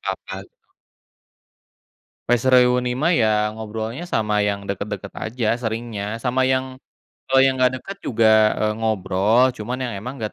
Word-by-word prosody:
apa-apa, - - -5 0.2
gitu. - - -51 1.6
Pas 120 0 +2
reuni 125 0 +4
mah 155 +8 +1
ya, 110 - +4 0.3
ngobrolnya 110 +7 -5
sama 105 -1 0
yang 100 0 -2
deket-deket 100 0 -5
aja 115 0 -3
seringnya, 110 -2 -4 0.2
sama 130 +1 +1
yang 130 0 +1 0.6
kalau 135 0 +3
yang 135 -1 +2
enggak 130 0 +3
deket 195 0 -8
juga, 115 -2 +2 0.3
eee, 105 0 +1
ngobrol 110 +1 +1
cuman 120 +4 -4
yang 120 - -3
emang 125 +6 -6
enggak 105 - -4
115 Hz, 145 wpm, -21 LUFS, 105-125 Hz, 1.6 s, reuni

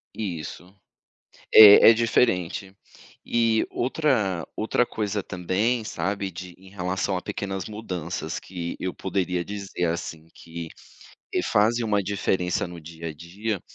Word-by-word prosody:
Isso. 90 -1 -6 0.8
É 105 0 +10
é - - +8
diferente. 100 -5 +1 0.5
E 115 -1 +2
outra 120 - 0
outra 110 +3 +1
coisa 105 -3 -3
também, 100 +6 -1
sabe, 100 -2 -3
de 90 0 -9
em 95 0 -16
relação 95 0 -2
a - - -4
pequenas 95 -2 -4
mudanças 90 -6 -5
que 85 -2 -6
eu 95 -1 -2
poderia 90 -2 -2
dizer 100 -2 -4
assim 80 -1 -4
que, 85 0 -8 0.7
eh, - - +1
fazem 115 +3 +2
uma 105 -2 +1
diferença 95 -2 -1
no 85 -1 -9
dia 85 +1 -8
a 80 - -5
dia, 95 +6 -4
95 Hz, 130 wpm, -25 LUFS, 90-105 Hz, 0.8 s, É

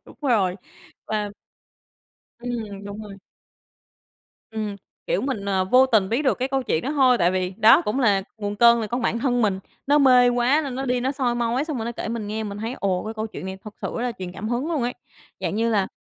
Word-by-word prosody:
Đúng - - -16
rồi. 205 -9 +2 0.5
Và 210 -1 -2 1.1
Ừm, 220 -5 -5
đúng 205 +2 -7
rồi. 205 -2 -9 1.4
Ừm, 215 -2 -4 0.3
kiểu, - - +1
mình, 260 -7 -3
ờ, 190 -2 +1
vô 255 +7 +5
tình 220 -7 +2
biết 235 +7 0
được 270 - +1
cái 260 +1 -1
câu 270 -1 0
chuyện 160 - -1
đó 280 - -2
thôi 260 -5 +4
tại 175 0 +3
vì, 185 -1 -1
đó, 225 0 +7
cũng 215 +6 -1
là 205 -6 +3 0.2
nguồn 205 0 -3
cơn 235 +1 +6
là 220 - -2
con 240 +4 -3
bản 230 - 0
thân 245 -1 +1
mình, 195 -3 +1 0.3
nó 290 +2 +4
mê 250 -3 +6
quá 245 +5 +3
nên 270 -3 -4
nó 270 +1 -3
đi 250 -1 0
nó 265 +3 0
soi 255 -3 0
mói, 240 +3 0
xong 305 -4 -4
rồi 225 - -3
nó 235 - -3
kể - - -5
mình 225 -2 -3
nghe. 220 +1 -3
Mình 200 -1 -6
thấy, 225 +3 -3
ồ, 190 -1 0
cái 220 - -5
câu 220 0 -3
chuyện 200 -3 -8
này 190 0 -6
thật 215 -1 -9
sự - - -3
rất 235 - -2
là 245 -1 -1
truyền 180 -1 -6
cảm 215 +4 -5
hứng 245 +6 -1
luôn 290 -6 0
ấy, 245 +1 -1 0.5
dạng - - -2
như 230 +1 +1
là, 200 -3 +2
230 Hz, 245 wpm, -23 LUFS, 205-250 Hz, 1.4 s, đó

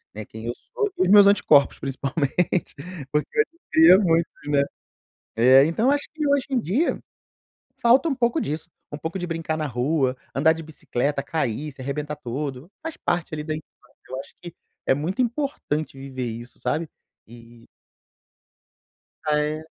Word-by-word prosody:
Né, 110 0 -6
quem 110 +2 -10
eu 120 - -1 0.2
sou, 425 -4 0
e - - +2
os 180 - +1
meus 205 0 +9
anticorpos 150 -8 +4
principalmente, 140 +6 -1 0.4
porque 150 0 +1
eu - - +7
adquiria 330 - +5
muito, 165 -4 +2 0.2
né. 145 -1 +3 0.7
É, 130 +4 +7
então 215 - +2
acho 285 0 0
que 305 -1 -1
hoje 280 -2 +2
em 260 - +1
dia 235 - 0 0.8
falta 250 +6 +5
um 275 - 0
pouco 240 -2 +1
disso, 155 +3 -4 0.2
um 145 - -5
pouco 160 +5 -4
de 175 - -3
brincar 165 -1 -2
na 155 -1 -2
rua, 130 +1 0 0.2
andar 155 +4 +4
de 165 - -7
bicicleta, 145 -2 -2
cair, 150 -1 -2
se 135 -1 -12
arrebentar 150 +3 -3
todo, 135 +4 -5
faz 325 -1 -5
parte, 175 -2 -1
ali, 150 - -4
da 155 0 -3
infância. 155 - -14
Eu 130 +1 -4
acho - - -10
que 175 -2 -9 0.3
é - - +5
muito 170 - -1
importante 235 - -2
viver 135 -1 -5
isso, 120 +2 -9
sabe. 160 +1 -1 0.4
E 115 0 -15 1.6
Ah, 150 -1 +2
é. 155 +1 -2
155 Hz, 165 wpm, -24 LUFS, 135-195 Hz, 1.6 s, meus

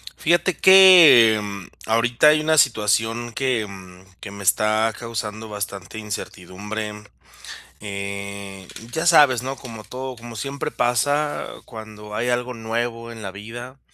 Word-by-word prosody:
Fíjate 175 +2 +1
que, 180 -12 +8
em, 100 -3 -6 0.2
ahorita 115 +5 +2
hay 155 0 +3
una 155 0 +1
situación 115 -1 +1
que, 125 -3 -1
mm, 95 -2 -13
que 100 - -9
me 100 0 -9
está 110 +4 +2
causando 110 -2 -6
bastante 100 0 -7
incertidumbre, 105 +1 -7 0.9
eh, 100 -1 -7 0.2
ya 160 +4 -2
sabes, 145 -8 +5
¿no?, 135 +1 -5
como 115 -5 -10
todo, 130 0 -7
como 115 0 -11
siempre 140 +6 -5
pasa 145 +5 -1 0.2
cuando 105 -2 -11
hay 120 +3 -2
algo 125 +1 -2
nuevo 115 +1 -4
en 115 -1 -11
la 95 -2 -6
vida 120 +6 -10
115 Hz, 135 wpm, -21 LUFS, 105-125 Hz, 0.9 s, que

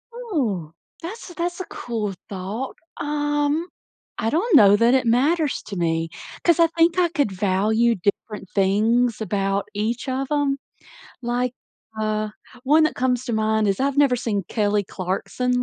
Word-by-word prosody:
Oh, 255 - -2 0.3
that's 385 +5 -7
a - - -10
that's 350 +1 -3
a 370 - -4
cool 220 -9 -4 0.2
thought, 200 +7 -5 0.3
um 295 +2 0 0.5
I 225 - +1
don't 360 - +2
know 205 -6 +8
that 230 +4 +4
it 260 -2 +3
matters 290 +6 +2
to 200 - -6
me, 165 -2 0 0.3
'cause 340 -1 +4
I 335 - +6
think 330 +2 +2
I 350 - +3
could 285 - 0
value 210 +5 +2
different 200 +2 -3
things 220 +5 +2
about 195 -1 -1
each 220 +5 -2
of 265 +1 -1
'em, 285 -2 +1 0.7
like, 245 +1 -1 0.4
uh, 215 0 -1 0.4
one 300 +4 +5
that 310 - +1
comes 250 -1 0
to 240 - -3
mind 220 0 +1
is 195 +2 0
I've 275 +1 0
never 285 -3 +4
seen 210 -5 -2
Kelly 205 -2 +1
Clarkson 245 +7 -2
240 Hz, 155 wpm, -23 LUFS, 205-290 Hz, 0.7 s, know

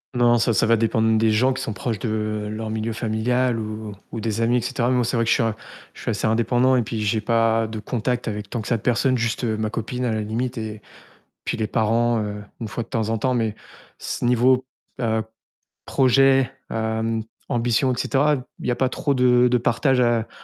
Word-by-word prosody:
Non, 120 -1 +4
ça 115 - +2
ça - - +3
va 115 +1 +4
dépendre 110 0 +2
des 110 0 +3
gens 125 +5 +3
qui 130 - -5
sont - - -3
proches 110 +1 -3
de 110 -1 -2
leur 110 0 -4
milieu 110 +1 -2
familial 115 +2 0
ou 110 -1 -5 0.2
ou 115 - -4
des 110 0 -2
amis 120 +2 +3
et - - 0
cetera. 125 0 -1
Moi 125 -1 +2
c'est 120 - -1
vrai 115 - +2
que 115 - -1
je - - +5
suis - - +1
a 115 -1 0 0.4
je - - -13
suis - - -3
assez - - -1
indépendant 120 +3 +3
et 125 - +3
puis 110 -1 -4
j'ai 110 +1 +1
pas 115 0 +2
de 110 0 -6
contacts 120 +3 -2
avec 105 -2 -4
tant 120 - -3
que 110 - -8
ça 120 - +1
de - - -11
personnes, 125 +2 +1
juste 115 +1 -1
ma 110 -2 -1
copine 125 +3 -3
à 120 - 0
la 110 0 -1
limite 120 +4 -3
et 110 -1 -5 0.6
puis - - -2
les 110 - 0
parents, 115 +2 +1
heu, 105 0 -5 0.2
une 110 - -3
fois 115 - -4
de - - -11
temps 110 -1 -1
en 115 - 0
temps 130 +2 0
mais, 110 -3 0 0.4
ce - - -4
niveau, 125 +2 +3 0.4
heu, 110 -1 +1 0.6
projet, 135 0 +4 0.2
hem, 110 0 -1 0.3
ambition 120 +2 +1
et 125 - -2
cetera, 145 +3 +2 0.2
il - - -5
y - - +2
a - - 0
pas 130 - +1
trop 140 +2 -1
de 125 -1 +4
de 125 - +3
partage 120 +3 +1
a 120 -2 +2
115 Hz, 230 wpm, -23 LUFS, 110-125 Hz, 0.6 s, je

